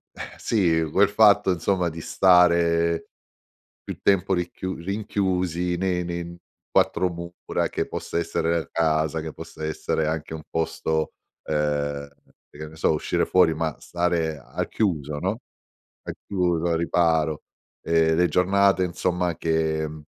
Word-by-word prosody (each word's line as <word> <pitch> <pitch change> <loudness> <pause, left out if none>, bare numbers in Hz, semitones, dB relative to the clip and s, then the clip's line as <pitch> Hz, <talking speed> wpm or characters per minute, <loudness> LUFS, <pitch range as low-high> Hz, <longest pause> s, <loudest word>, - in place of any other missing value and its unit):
Ehm, - - -8
sì 80 -7 +1
quel 100 +5 +4
fatto 105 -2 +5
insomma 90 0 0
di 80 0 -8
stare 85 -2 +3 0.8
più - - -7
tempo 95 -1 +3
ricchiu 90 +1 -3
rinchiusi 90 -2 -1
ne 90 -1 0
ne 85 0 -3
n 85 0 -9 0.3
4 90 - +2
mura, 85 0 -4
che - - -2
possa - - -4
essere 85 0 0
la 80 - -6
casa 80 -1 +1
che 80 0 -6
possa 80 -1 -9
essere 80 0 -1
anche 80 0 -3
un 80 - -7
posto 80 -1 -2 0.3
ehm, 75 -1 -1 0.4
e - - -16
che 75 0 -6
ne 80 - -14
so, 80 - +2
uscire 75 - 0
fuori 90 -3 +4
ma 80 -1 -2
stare 85 -3 -1
al 70 - -5
chiuso, 75 -8 -1
no. 95 +8 -2 0.7
Al - - -4
chiuso, 90 -3 0
al 80 - +1
riparo, 80 -2 +1 0.4
ehm, 80 -1 +3
le 90 +1 +3
giornate 95 +1 +3
insomma 90 -1 -1
che, 80 -1 0
mhmm 75 0 -10
85 Hz, 145 wpm, -24 LUFS, 80-90 Hz, 0.8 s, fatto